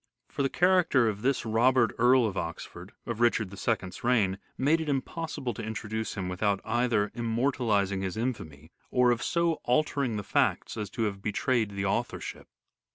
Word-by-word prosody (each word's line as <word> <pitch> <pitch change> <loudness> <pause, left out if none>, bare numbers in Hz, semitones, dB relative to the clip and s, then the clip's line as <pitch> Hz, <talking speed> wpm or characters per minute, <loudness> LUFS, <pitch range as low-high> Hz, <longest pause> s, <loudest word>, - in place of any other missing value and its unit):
For - - -3
the 135 - +2
character 175 -9 +3
of 105 -1 -2
this 135 +1 0
Robert, 120 +2 +3
Earl 125 +1 +5
of 105 -3 -2
Oxford, 85 -3 -6
of 115 -1 -4
Richard 110 -4 +2
II's 100 0 -2
reign, 105 -6 +2 0.2
made 155 +5 +2
it 155 - -3
impossible 140 -2 -3
to 110 - -7
introduce 110 0 -4
him 95 -3 -3
without 100 +2 0
either 120 -4 +1
immortalizing 115 -4 0
his 95 +1 -3
infamy 80 - -4 0.2
or 125 -1 +4
of 120 - 0
so 170 -1 +1
altering 130 -2 +1
the 105 - -4
facts - - 0
as 105 -2 -4
to 115 - -3
have 100 -2 -2
betrayed 110 +2 0
the 100 0 -2
authorship. 95 - -3
115 Hz, 165 wpm, -28 LUFS, 100-130 Hz, 0.2 s, Earl